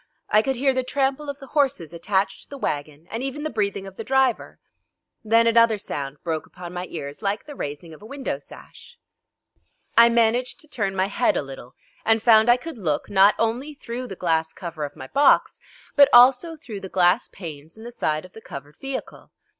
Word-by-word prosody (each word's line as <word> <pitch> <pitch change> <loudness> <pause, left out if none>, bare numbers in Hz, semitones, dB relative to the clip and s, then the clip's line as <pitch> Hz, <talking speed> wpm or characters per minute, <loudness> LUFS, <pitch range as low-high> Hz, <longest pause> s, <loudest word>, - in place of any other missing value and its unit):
I 215 - +6
could 265 +4 -1
hear 270 +2 +2
the 260 - 0
trample 275 +2 -1
of 280 - -5
the 280 - -11
horses 270 - 0
attached 190 +3 -1
to - - -12
the 280 - -8
wagon, 150 - -4
and 225 +3 -3
even 270 +2 -4
the 310 - -3
breathing 200 -3 -2
of 195 -1 -11
the 225 - -5
driver. 265 0 +1 0.7
Then 230 +1 +4
another 230 -1 +4
sound 140 -7 -5
broke 160 -2 -3
upon 180 -1 -10
my 180 0 -5
ears 145 -1 -7
like 200 0 -2
the 295 - -9
raising 155 - -6
of 155 - -14
a 215 - -11
window 275 +2 -4
sash. 480 0 -15 1.0
I 235 0 +8
managed 235 +5 +1
to 310 - -15
turn 200 -8 -2
my 190 0 +2
head 200 - +1
a - - -1
little, 135 -2 -11 0.3
and 225 0 +3
found 220 -1 +6
I 240 - +6
could 265 -1 -9
look, 155 -4 -2
not 195 +1 +6
only 245 +7 -1
through 250 -1 -6
the 190 - -7
glass 160 -2 0
cover 165 -4 -5
of 145 - -9
my 130 - -9
box, 280 - +3 0.4
but 285 -1 +7
also 255 +7 +6
through 240 -10 -8
the 190 - -8
glass 180 +5 +3
panes 160 -2 -10
in 220 - -12
the 240 - -8
side 155 -8 -2
of 185 - -16
the 220 - -12
covered 145 -5 -10
vehicle. 270 -1 -7
220 Hz, 210 wpm, -23 LUFS, 170-255 Hz, 1.0 s, I